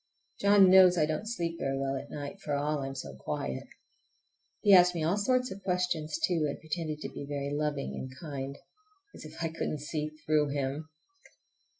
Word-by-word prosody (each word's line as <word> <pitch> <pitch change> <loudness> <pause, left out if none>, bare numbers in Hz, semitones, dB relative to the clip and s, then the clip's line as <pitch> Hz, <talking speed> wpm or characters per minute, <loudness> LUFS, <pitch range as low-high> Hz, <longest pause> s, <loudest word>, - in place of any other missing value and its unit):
John 200 -2 +6
knows 185 -1 +8
I 155 - +4
don't 155 +8 -3
sleep 170 -7 -3
very 135 0 -1
well 135 0 -1
at 135 - -6
night, 150 +7 -6
for 145 -5 -2
all 150 +1 0
I'm 135 0 -4
so 100 - -6
quiet! 65 0 -4 0.9
He 205 - +6
asked 180 -1 +7
me 165 - -1
all 165 +5 +2
sorts 250 +4 +1
of 195 +1 -7
questions, 180 - -1
too, 175 - +1
and - - -5
pretended 155 -1 -4
to - - -4
be - - -7
very 140 -1 -3
loving 145 -2 -2
and 130 - -6
kind. 140 -3 -5 0.6
As - - -11
if 160 +2 -7
I 165 - 0
couldn't 155 -2 -3
see 150 0 -3 0.2
through 150 -1 +3
him! 140 +3 -3
155 Hz, 190 wpm, -30 LUFS, 145-180 Hz, 0.9 s, knows